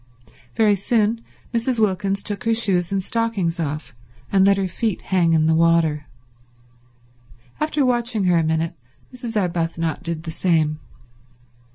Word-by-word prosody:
Very 215 -2 +4
soon 220 +3 0 0.3
Mrs. 235 +1 0
Wilkins 195 -1 0
took 205 0 -3
her 230 0 +2
shoes 190 -6 +1
and 195 -1 -1
stockings 205 -7 -1
off, 150 -3 -4 0.4
and 195 -1 +4
let 195 0 +4
her 195 -1 0
feet 215 +2 -2
hang 175 -3 +2
in 155 -1 +3
the 160 - +3
water. 160 -2 +2 1.5
After 305 -2 +1
watching 240 -4 0
her 180 -2 +3
a - - +1
minute 160 +1 0 0.4
Mrs. 235 -3 -3
Arbuthnot 165 -3 -2
did 170 -2 -4
the 165 - -5
same. 160 -3 +1
190 Hz, 145 wpm, -21 LUFS, 165-220 Hz, 1.5 s, Very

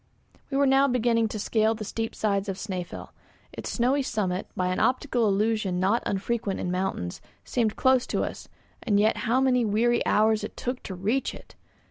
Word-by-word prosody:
We 275 - -1
were 280 - +4
now 270 +1 +4
beginning 235 -3 +2
to 215 - -5
scale 220 +1 +1
the 215 - -6
steep 225 +2 -4
sides 200 -1 0
of 190 - -3
Snæfell. 185 -4 -5 0.4
Its - - -6
snowy 260 +4 +2
summit, 200 -8 -2
by 180 0 +1
an 185 - -1
optical 250 -3 +1
illusion 205 -2 +1
not 200 +6 +2
unfrequent 200 0 -2
in 180 - -2
mountains, 180 - -3 0.2
seemed 225 -4 0
close 260 -1 +3
to - - 0
us, - - -6 0.3
and 205 -4 +2
yet 215 +2 +3
how 250 +3 +4
many 255 -2 +3
weary 230 +3 +2
hours 215 0 +3
it - - -7
took 250 +1 -3
to 190 - -4
reach 215 +9 -1
it! - - -14
220 Hz, 185 wpm, -26 LUFS, 195-245 Hz, 0.4 s, were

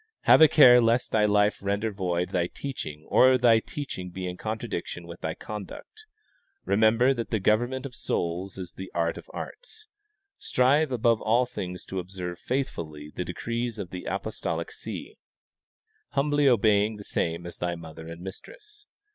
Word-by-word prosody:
Have - - +6
a 160 - +10
care 125 -5 +8
lest 115 +1 +2
thy 105 -1 +3
life 105 0 +3
render 100 +3 -1
void 90 -3 -1
thy 85 -1 0
teaching 80 - -7
or 130 0 +6
thy 115 -2 +5
teaching 110 -8 -6
be 90 +1 -5
in 90 - -4
contradiction 110 -4 -5
with 85 +1 -10
thy 80 - -3
conduct. 105 - -9 0.6
Remem 110 +2 +4
ber 125 +3 +4
that 115 -3 -4
the 110 - 0
government 120 +6 +1
of 135 - -7
souls 90 -2 -3
is 95 -2 -7
the 95 0 -8
art 85 -1 0
of - - -15
arts. 440 -3 -8 0.5
Strive 135 +4 +2
above 115 -2 +2
all 120 +3 +3
things 90 -6 -6
to 95 - -4
observe 90 -1 -6
faithfully 80 - -4
the 90 - -3
decrees 115 +6 -3
of 95 -4 -6
the 90 -1 -7
apostolic 95 -4 -3
see, - - -8 1.0
humbl}^ 145 +1 +3
obeying 110 -3 +3
the 105 - -9
same 85 -2 -2
as 85 - -8
thy 85 0 -1
mother 80 -1 -10
and 85 +1 -9
mistress. 420 - -11
105 Hz, 165 wpm, -27 LUFS, 90-125 Hz, 1.0 s, a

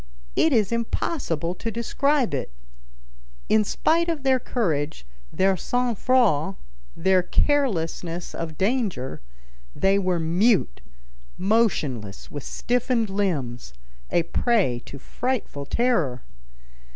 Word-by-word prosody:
It 320 - +4
is 220 -6 +2
impossible 225 - -1
to 225 +5 -4
describe 250 - +1
it. 130 - -3 1.0
In 215 0 +5
spite 335 +10 +1
of 315 -5 -2
their 265 -1 +3
courage, 155 - -2 0.3
their 190 0 +2
sang 245 +6 0
froid, 195 - +2 0.4
their 185 +2 +3
carelessness 180 - 0
of 160 -2 -5
danger, 195 - -1 0.5
they 195 +1 +3
were 185 -3 0
mute, 175 - +2 0.6
motionless 160 - 0
with 145 - -5
stiffened 240 - 0
limbs, 135 - -2 0.3
a 170 - +2
prey 180 - +1
to 140 - -8
frightful 215 - -3
terror. 175 - +1
195 Hz, 105 wpm, -24 LUFS, 160-245 Hz, 1.0 s, In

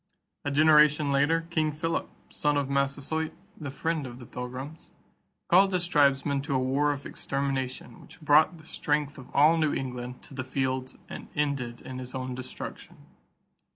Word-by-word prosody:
A 145 - -1
generation 150 0 +5
later, 155 +4 +2
King 155 -2 +1
Philip, 165 +3 -2 0.2
son 150 -1 +1
of 140 -1 -1
Massasoit, 140 +3 0 0.2
the 145 -3 -6
friend 155 +1 -2
of 120 -1 -9
the 125 - -10
Pilgrims, 130 +6 -7 0.5
called 190 +3 +5
his 180 -2 0
tribesmen 140 -2 +3
to 140 -1 -2
a - - +4
war 135 +3 +2
of 140 -1 -5
extermination 135 -2 -3
which - - -13
brought 155 +2 +4
the 160 - -15
strength 150 -2 -1
of 125 - -12
all 155 +4 +6
New 155 -2 +1
England 125 -1 -5
to - - -12
the 130 -1 -3
field 130 -1 -2
and - - -8
ended 140 -5 -1
in 130 -1 -7
his 125 0 -7
own 130 0 -3
destruction. 130 0 -8
140 Hz, 165 wpm, -28 LUFS, 130-155 Hz, 0.5 s, all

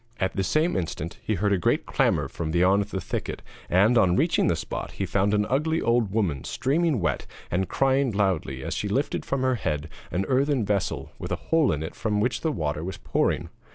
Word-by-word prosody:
At 95 - -1
the 95 - 0
same 155 - +1
instant 85 -2 -3
he 110 - -1
heard 100 +2 +1
a 95 - +2
great - - +1
clamour - - +1
from 80 -1 -4
beyond 90 +4 +3
the 100 -2 -4
thicket, 85 - -4 0.3
and, 110 +7 +5
on 90 -3 +4
reaching 165 - +2
the 85 - +2
spot, - - -5
he - - -2
found 100 +1 +1
an 105 0 +2
ugly 160 +5 +1
old 115 -4 +2
woman 95 - 0
streaming 145 +2 +1
wet 85 - -1 0.2
and 95 +2 0
crying 135 0 +2
loudly 90 -10 0
as - - -3
she 105 - -2
lifted 130 +8 -1
from 135 -1 0
her 130 0 +3
head 75 0 -2 0.2
an 95 +2 -1
earthen 135 -2 +2
vessel 100 -2 -1
with - - -6
a - - +2
hole 160 -8 +2
in 75 -1 -2
it 80 - -5
from 105 -2 -1
which 120 +4 0
the 160 - 0
water 75 - -2
was 95 +2 -5
pouring. - - 0
100 Hz, 215 wpm, -26 LUFS, 90-130 Hz, 0.3 s, and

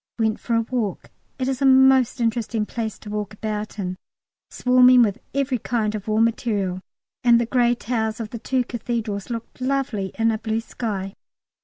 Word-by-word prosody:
Went 220 -1 0
for 235 - -1
a 230 - +3
walk. 225 -6 -3 0.3
It 260 -2 -2
is 265 -1 -2
a - - +3
most 265 -1 +5
interesting 230 -1 0
place 220 -1 -4
to 210 - -11
walk 210 0 -4
about 215 0 -4
in, 185 -2 -3 0.5
swarming 250 0 +5
with 205 -4 0 0.2
every 270 -3 0
kind 215 -2 -1
of 210 -1 -6
war 215 0 +1
material, 210 -5 0 0.4
and 235 -1 +6
the 235 - +1
grey 240 0 +2
towers 225 -2 -2
of 220 -2 -5
the 235 - -6
two 255 +2 0
Cathedrals 230 -4 -4
looked 230 +2 -6
lovely 255 -7 -1
in 225 0 +3
a 220 - -2
blue 220 0 -1
sky. 200 -5 -4
230 Hz, 180 wpm, -23 LUFS, 215-245 Hz, 0.5 s, and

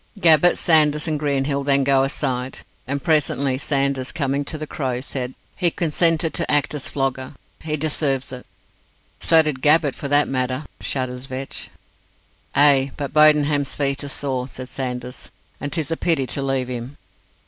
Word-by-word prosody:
Gabbett, 170 -1 +5
Sanders 155 -1 +3
and 155 -2 -1
Greenhill 140 -1 -1
then 140 0 +2
go 135 0 +3
aside, 130 -2 -2 0.3
and 140 +1 -3
presently 140 -4 +1
Sanders, 140 -2 -1
coming 140 -3 -1
to 155 - -4
the 155 - -5
Crow, 130 -5 -3
said, 130 -1 -5 0.2
"He 175 - +2
consented 165 0 +1
to - - -1
act 145 -1 +1
as 145 -3 -4
flogger. 135 0 -3 0.2
He 155 -1 -3
deserves 140 -3 0
it." 125 -1 -9 0.7
"So 160 -1 +4
did 150 -4 -3
Gabbett, 150 -1 +4
for 140 - -5
that 145 +1 +4
matter," 130 +2 -2
shudders 130 -1 -4
Vetch. 130 +1 -6 0.9
"Ay, 140 -2 +5
but 140 -2 -5
Bodenham's 150 -2 +4
feet 140 0 0
are 145 - -6
sore," 130 -3 -2
said 130 -1 -8
Sanders, 125 -1 -6 0.3
"and 145 - -5
'tis 160 -3 -1
a 165 - -1
pity 160 -6 +1
to 140 - -1
leave 135 -2 -1
him." 125 +2 -6
140 Hz, 160 wpm, -21 LUFS, 130-150 Hz, 0.9 s, Gabbett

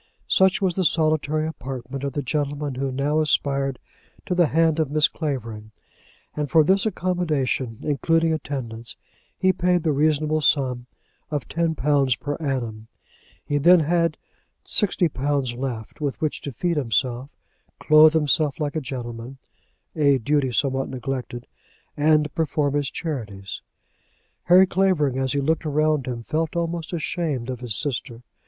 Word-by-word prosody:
Such 190 +1 +3
was 185 -2 +2
the 185 - 0
solitary 155 -1 +1
apartment 135 -3 -6
of 140 -2 -3
the 145 - -2
gentleman 145 +1 -2
who 135 +1 -2
now 140 +4 0
aspired 140 -3 0 0.5
to 180 - -1
the 175 -2 +3
hand 160 +1 +2
of 155 -3 +1
Miss 150 +1 +4
Clavering; 115 -10 -5 0.7
and 150 -2 -2
for 160 +3 +5
this 190 +6 +3
accommodation, 155 - -1
including 165 +2 +1
attendance, 120 -6 -5 0.4
he 185 0 +3
paid 180 -1 +1
the 160 - +2
reasonable 155 +1 +1
sum 130 -4 +1 0.4
of 145 -4 -3
£10 145 -5 +1
per 145 - -3
annum. 120 -7 -3 0.6
He 145 - 0
then 175 +4 +6
had 170 +1 +1 0.5
£60 145 - +1
left, 120 -1 -5
with 140 -3 -2
which 155 -2 -2
to 140 - -5
feed 170 +6 -1
himself, 125 +1 -1 0.4
clothe 155 0 +6
himself 150 -1 +2
like 150 -1 -2
a 155 - -1
gentleman, 120 -1 -7 0.6
a 140 -3 +4
duty 135 +1 0
somewhat 135 +2 0
neglected, 125 -2 -5 0.5
and 150 0 +2
perform 150 -3 0
his 145 -2 0
charities! 105 - -5 0.8
Harry 185 +2 +7
Clavering, 175 -8 +1
as 130 -1 0
he 140 - 0
looked 160 +4 0
around 150 -2 +1
him, 120 -2 -4
felt 160 +5 -2
almost 170 -1 -3
ashamed 155 -6 -2
of 125 - -6
his 120 -4 -4
sister. 125 -2 -4
145 Hz, 145 wpm, -23 LUFS, 130-160 Hz, 0.8 s, Harry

